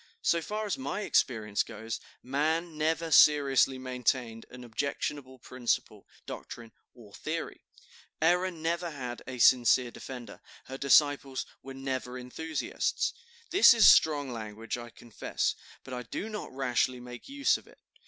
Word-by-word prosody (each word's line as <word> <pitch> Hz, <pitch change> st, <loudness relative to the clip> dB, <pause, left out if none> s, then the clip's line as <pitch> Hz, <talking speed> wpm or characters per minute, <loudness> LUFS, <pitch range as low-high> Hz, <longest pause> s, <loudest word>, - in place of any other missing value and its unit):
So 170 Hz, -, +2 dB
far 215 Hz, +5 st, -3 dB
as 205 Hz, -, -2 dB
my 140 Hz, +10 st, -3 dB
experience 110 Hz, -, +1 dB
goes, 115 Hz, 0 st, -5 dB, 0.2 s
man 155 Hz, +5 st, -1 dB
never 160 Hz, +2 st, 0 dB
seriously 140 Hz, -3 st, +5 dB
maintained 125 Hz, -2 st, -2 dB
an 125 Hz, 0 st, -11 dB
objectionable 130 Hz, +2 st, -4 dB
principle, 125 Hz, -1 st, -3 dB, 0.2 s
doctrine, 115 Hz, -1 st, -8 dB, 0.2 s
or 110 Hz, -5 st, -16 dB
theory; 160 Hz, +1 st, -5 dB, 0.6 s
error 180 Hz, +3 st, +3 dB
never 170 Hz, 0 st, -2 dB
had 125 Hz, -5 st, -6 dB
a 130 Hz, -1 st, -6 dB
sincere 125 Hz, 0 st, +5 dB
defender; 125 Hz, -2 st, -9 dB, 0.2 s
her 135 Hz, -, -7 dB
disciples 140 Hz, -1 st, +3 dB, 0.2 s
were 135 Hz, 0 st, -9 dB
never 130 Hz, -2 st, -4 dB
enthusiasts. 145 Hz, +5 st, -2 dB, 0.4 s
This 360 Hz, -, +8 dB
is 225 Hz, -, +7 dB
strong 145 Hz, -4 st, +5 dB
language, 110 Hz, -1 st, -5 dB
I 120 Hz, -1 st, -8 dB
confess, 115 Hz, -1 st, -3 dB, 0.3 s
but 130 Hz, -, -9 dB
I 125 Hz, -, -3 dB
do 160 Hz, -, -5 dB
not 215 Hz, -1 st, -6 dB
rashly 130 Hz, -1 st, 0 dB
make 125 Hz, 0 st, -10 dB
use 280 Hz, 0 st, +2 dB
of -, -, -18 dB
it. -, -, -19 dB
130 Hz, 140 wpm, -29 LUFS, 125-160 Hz, 0.6 s, This